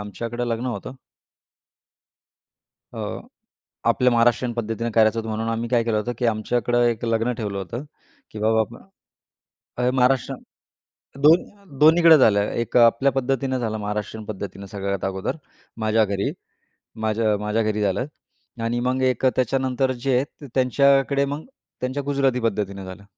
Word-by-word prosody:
आमच्याकडे 115 +4 -4
लग्न 115 +2 -2
होतं. 125 +1 -5 2.0
अ, - - -7 0.9
आपल्या 125 0 +3
महाराष्ट्रीयन 120 +1 +2
पद्धतीने 115 0 -3
करायचं 110 0 +4
होतं 110 - -7
म्हणून 110 +1 -2
आम्ही 115 +1 -2
काय 120 -2 +2
केलं 115 -2 0
होतं, 120 +3 -2
की 120 - +1
आमच्याकडे 120 +2 0
एक 115 0 -4
लग्न 115 +1 +1
ठेवलं 100 -3 -3
होतं 115 +9 -5 0.5
की 110 - -8
बाबा 110 +1 +3 1.2
अ, 125 0 +2
महाराष्ट्र 130 -1 +2 0.9
2 170 0 +2
2न्हीकडं 160 +1 +7
झालं. 105 -5 +5
एक 120 +1 -2
आपल्या 120 +3 +4
पद्धतीनं 135 0 -1
झालं 110 -3 -2
महाराष्ट्रीयन 105 +1 -4
पद्धतीनं 100 -1 -7
सगळ्यात 100 0 -4
अगोदर 95 +6 -3 0.5
माझ्या 110 0 +3
घरी. 100 -1 -1 0.7
माझ्या 110 -1 +1
माझ्या 105 +2 -1
घरी 105 0 -1
झालं 100 +4 0 0.6
आणि 120 +1 -1
मग 130 +1 0
1 130 0 +1
त्याच्यानंतर 130 +1 +1
जे 130 +1 -1
आहेत 140 +3 -3
त्यांच्याकडे 140 +2 +3
मग 145 +3 -5 0.4
त्यांच्या 130 +3 -2
गुजराती 135 -2 +1
पद्धतीनं 100 -3 -2
झालं. 95 +2 -10
120 Hz, 135 wpm, -23 LUFS, 110-130 Hz, 2.0 s, 2न्हीकडं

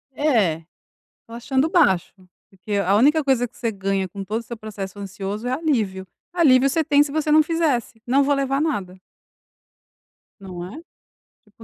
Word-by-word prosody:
É, 225 - +2 0.6
estou 230 - -12
achando 265 +4 0
baixo. 290 - +2 0.4
Porque 195 +2 -8
a 200 0 +2
única 295 +7 +4
coisa 260 -3 +1
que 235 - -23
você 230 -2 -2
ganha 195 -1 -2
com 195 +2 -7
todo 215 +4 -3
o - - -9
seu 235 - -7
processo 205 -3 -8
ansioso 200 +3 -5
é - - -1
alívio. 225 - -1 0.2
Alívio 275 -6 +4
você 320 +4 +1
tem 290 -2 +4
se 290 -1 0
você 310 0 -1
não 310 +1 +7
fizesse. 300 -8 -1
"Não 270 +3 +3
vou 285 +1 +2
levar 275 0 0
nada". 195 - -2 1.4
Não 180 -3 -8
é? 300 - -8 0.6
Tipo: 215 +2 -19
235 Hz, 170 wpm, -22 LUFS, 195-285 Hz, 1.4 s, não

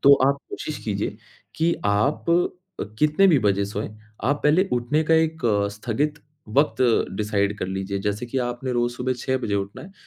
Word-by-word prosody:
तो 140 - +8
आप 140 0 +3
कोशिश 405 - -5
कीजिए - - -2 0.4
कि 165 +2 +2
आप 105 +12 +1 0.5
अ, - - -1
कितने 155 +6 +4
भी 160 -6 +5
बजे 100 -1 +2
सोएँ, 105 +1 -4 0.4
आप 145 +3 +1
पहले 170 +6 +4
उठने 125 +6 +1
का 160 - +4
1 160 -1 +1
अ, 100 -2 +2
स्थगित 125 +8 -2 0.3
वक़्त 140 +3 +2 0.3
डिसाइड 105 -1 0
कर - - -2
लीजिए, 95 +1 -3
जैसे 105 +3 -2
कि 130 +3 -2
आपने 125 +1 -4
रोज 120 0 +1
सुबह 130 +1 -1
6 130 +2 0
बजे 105 -5 -2
उठना 100 0 -3
है, 190 - -12
120 Hz, 185 wpm, -24 LUFS, 105-150 Hz, 0.5 s, तो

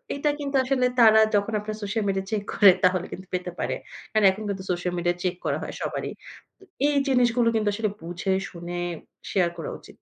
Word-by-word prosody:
এটা 295 +1 0
কিন্তু 280 -1 -3
আসলে 255 -1 +1
তারা 220 -1 +8 0.2
যখন 205 +2 +1
আপনার 215 +1 -5
সোশ্যাল 210 +2 -1
মিডিয়া 195 0 -1
চেক 210 -2 -1
করে, 200 -3 +8
তাহলে 185 -1 +3
কিন্তু 185 - -8
পেতে 180 0 -2
পারে। - - -1 0.4
কারণ 215 -2 +3
এখন 210 +3 -7
কিন্তু 190 -1 -3
সোশ্যাল 180 0 -2
মিডিয়া 175 0 +1
চেক 180 -1 0
করা - - +1
হয় - - -6
সবারই। - - -3 0.5
তো - - -20 0.2
এই 295 - +1
জিনিসগুলো 245 -2 +3
কিন্তু 215 -1 +1
আসলে 215 0 -1
বুঝে 175 +3 -3 0.2
শুনে 175 0 -7 0.5
শেয়ার 180 -3 +2
করা 165 - -5
উচিত। - - -17
200 Hz, 200 wpm, -25 LUFS, 180-225 Hz, 0.5 s, তারা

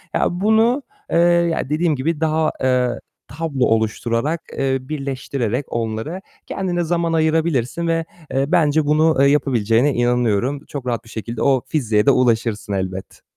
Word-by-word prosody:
Ya, - - +2
bunu, 225 +6 +3 0.3
eee, - - +2
ya 170 -4 +2
dediğim 155 +1 +1
gibi 150 +4 -2
daha, 160 0 +1
eee, 125 -2 +1 0.3
tablo 140 -2 -1
oluşturarak, 115 +7 0 0.2
eee, 135 -1 +1
birleştirerek 135 -3 -3
onlara 115 +10 -3 0.2
kendine 180 -3 -2
zaman 170 0 0
ayırabilirsin 160 -2 0
ve, 165 0 0 0.3
eee, 135 +1 +1
bence 155 -2 +3
bunu, 155 +2 +3
eee, 140 - +6
yapabileceğine 130 -2 +2
inanıyorum. 120 +3 0
Çok 140 -3 -6
rahat 115 -2 -2
bir - - -15
şekilde 115 +1 -6
o 135 -2 +3
fiziğe 110 -8 +1
de - - +6
ulaşırsın 115 -5 +1
elbet. 95 0 -5
140 Hz, 145 wpm, -20 LUFS, 120-160 Hz, 0.3 s, eee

